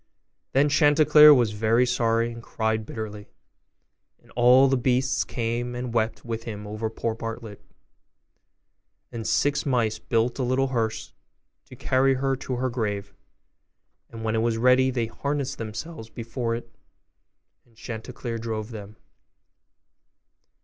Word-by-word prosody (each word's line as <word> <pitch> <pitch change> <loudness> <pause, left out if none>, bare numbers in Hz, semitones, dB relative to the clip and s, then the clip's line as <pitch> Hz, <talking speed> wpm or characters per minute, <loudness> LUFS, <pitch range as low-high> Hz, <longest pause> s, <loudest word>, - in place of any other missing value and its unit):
Then 140 +2 +4
Chanticleer 150 0 +6
was 120 -6 +4
very 115 +3 +2
sorry, 115 -1 +1
and 115 - -9
cried 110 -1 -2
bitterly; 105 -2 -7 0.9
and - - -23
all 125 +3 +5
the 135 - +2
beasts 130 +1 +1
came 120 +1 -3
and 125 -1 -5
wept 115 +1 -1
with 115 -1 -5
him 105 -2 -6
over 110 +2 -4
poor 115 0 -3
Partlet. 115 -1 -7 1.5
And 115 -2 -5
six 140 +7 +1
mice 120 -6 0
built 120 +3 0
a - - +1
little 130 +2 +1
hearse 115 -4 -2 0.5
to - - -13
carry 135 +1 +2
her 135 +1 0
to 130 0 -4
her 130 +1 -1
grave; 105 -4 -3 1.0
and 115 -1 -9
when 110 0 -1
it 110 - +1
was 115 -1 0
ready 125 +2 +4
they 120 -3 -1
harnessed 140 +3 -3
themselves 115 +3 -7
before 115 0 -3
it, 120 - -9 0.9
and 115 - -29
Chanticleer 115 0 -6
drove 110 0 -4
them. 105 -1 -9
115 Hz, 135 wpm, -25 LUFS, 110-130 Hz, 1.5 s, Chanticleer